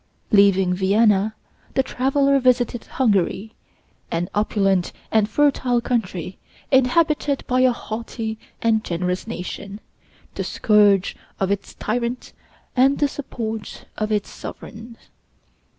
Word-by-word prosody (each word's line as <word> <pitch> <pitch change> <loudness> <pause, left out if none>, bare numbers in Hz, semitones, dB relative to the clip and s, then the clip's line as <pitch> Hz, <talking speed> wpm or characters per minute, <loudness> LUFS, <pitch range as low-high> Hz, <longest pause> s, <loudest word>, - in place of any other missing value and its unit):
Leaving 195 -3 +4
Vienna, 205 +2 +2 0.4
the 265 - +3
traveler 275 +2 +2
visited 245 -2 +1
Hungary, 215 -2 0 0.6
an 170 +1 -2
opulent 195 -3 +1 0.2
and 215 -1 +3
fertile 260 -2 +2
country, 190 -7 -3 0.3
inhabited 285 +2 +2
by 255 0 +1
a 255 0 +5
haughty 225 -1 -5 0.2
and 220 -1 +2
generous 180 +2 -2
nation, 200 0 -6 0.5
the - - -3
scourge 205 -3 +3 0.2
of 195 0 0
its 200 0 -3
tyrants 240 +3 -3 0.4
and 270 +2 +4
the 290 - +2
support 225 -6 -6
of 215 0 -2
its 210 -1 -1
sovereigns. 230 +1 -9
220 Hz, 110 wpm, -22 LUFS, 200-250 Hz, 0.6 s, a